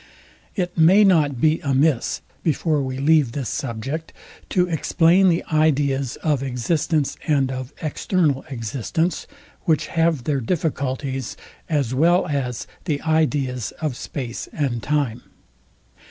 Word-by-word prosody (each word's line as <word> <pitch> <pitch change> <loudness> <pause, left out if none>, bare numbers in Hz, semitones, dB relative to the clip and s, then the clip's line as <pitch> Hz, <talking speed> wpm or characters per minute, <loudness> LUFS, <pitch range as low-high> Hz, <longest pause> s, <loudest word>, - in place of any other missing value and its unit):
It 180 -3 -2
may 180 +6 +6
not 155 -9 +3
be 155 +4 +3
amiss, 140 -2 +1 0.2
before 155 -1 +1
we 130 -1 -3
leave 145 -3 +3
this 135 -5 -3
subject, 135 +6 -4 0.4
to 180 -1 +2
explain 175 +3 +3
the 170 0 +1
ideas 140 -4 +2
of 150 -4 +1
existence 140 +4 0
and 140 -4 +2
of 130 0 -5
external 155 -2 0
existence; 135 - -2 0.4
which 160 -5 +2
have 165 -5 +2
their 140 0 0
difficulties, 135 -3 -2 0.3
as 140 -6 0
well 170 +7 +3
as 130 -5 -2 0.2
the 150 -5 0
ideas 145 -7 0
of 155 -6 -2
space 125 -4 -5
and 130 -6 -2
time. 140 -4 -1
145 Hz, 125 wpm, -22 LUFS, 130-160 Hz, 0.4 s, may